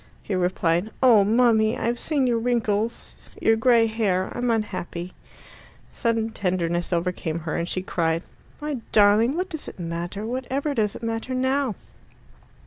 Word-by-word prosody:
He 210 - -4
replied, 180 +1 +1
"Oh, 230 -6 +7
mummy, 225 +1 +3
I've 240 +1 -1
seen 290 -4 0
your 235 -2 +2
wrinkles 225 -2 -1 0.3
your 225 - +4
grey 230 0 +4
hair 210 -5 -1
I'm 245 0 -1
unhappy." 185 -5 -3 0.8
Sudden 225 -1 -1
tenderness 175 -4 -1
overcame 170 -2 -1
her, 160 0 -3
and 170 +1 -2
she 185 - -1
cried, 165 -2 0 0.4
"My 295 -2 -3
darling, 215 +7 +4
what 370 +1 -2
does 315 -4 -6
it - - -9
matter? 175 +4 -4
Whatever 260 +4 -2
does 215 -5 0
it - - -9
matter 230 +3 -3
now?" 260 -2 0
220 Hz, 145 wpm, -24 LUFS, 185-245 Hz, 0.8 s, Oh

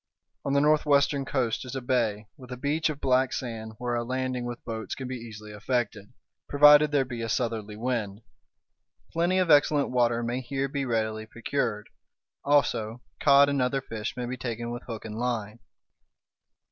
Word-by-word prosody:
On 140 - -1
the 140 - +4
northwestern 145 -2 +3
coast 125 -5 -1
is 125 0 -7
a - - -1
bay, 115 -4 0
with 130 -2 -13
a 125 - -5
beach 150 +5 0
of 150 -2 -4
black 130 -1 +2
sand 110 -3 -5
where 120 0 -3
a 120 0 0
landing 130 0 -2
with 120 0 -7
boats 110 -3 -4
can 130 - -6
be 130 - -4
easily 110 -3 -9
effected, 105 -1 -2 0.4
provided 150 +1 +7
there 145 -2 +2
be 120 -2 -6
a 115 - -3
southerly 110 -3 -2
wind. 110 -3 -3 0.9
Plenty 175 +3 +2
of 180 -3 +2
excellent 145 0 +4
water 120 -1 +2
may 120 +2 -2
here 135 +2 -2
be 140 0 -3
readily 110 -2 -1
procured; 115 -2 -2 0.6
also 120 -5 +1 0.2
cod 140 0 +6
and 140 -2 0
other 125 +2 +1
fish 115 -3 -6
may 125 - -2
be 125 +1 -4
taken 120 -1 -4
with 120 +1 -5
hook 115 -3 -6
and 110 0 -6
line. 115 -3 -2
125 Hz, 175 wpm, -27 LUFS, 115-140 Hz, 0.9 s, provided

